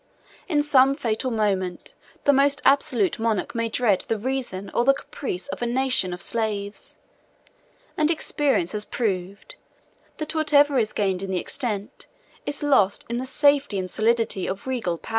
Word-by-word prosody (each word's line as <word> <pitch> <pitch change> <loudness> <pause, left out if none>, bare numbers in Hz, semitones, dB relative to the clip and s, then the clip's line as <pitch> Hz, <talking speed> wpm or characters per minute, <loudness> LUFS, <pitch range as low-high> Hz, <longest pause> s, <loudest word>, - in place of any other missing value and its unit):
In 300 -6 +1
some 275 -2 +4
fatal 240 -2 -2
moment, 195 -6 -2 0.3
the 285 - +5
most 280 +1 +3
absolute 285 - +3
monarch 225 -3 -1
may 230 -1 -1
dread 220 -4 +1
the 225 - 0
reason 230 -5 -4
or 235 - +2
the 275 +2 +4
caprice 220 -8 -5
of - - -6
a 240 - 0
nation 250 -6 +2
of 180 +1 -5
slaves; 210 -3 -3 1.0
and 305 0 +2
experience 290 - 0
has 210 -1 -1
proved, 200 - -4 0.6
that 310 0 -4
whatever 290 -3 +3
is 215 -2 0
gained 190 -3 -1
in 195 - -5
the 190 - -1
extent, 215 +3 -5 0.4
is 290 +1 -3
lost 205 -9 +2
in 235 - -2
the 260 - -4
safety 285 -5 +3
and 185 -1 -3
solidity, 225 -3 +1
of 190 +1 -5
regal 235 -10 -2
power. - - -13
235 Hz, 160 wpm, -24 LUFS, 200-275 Hz, 1.0 s, the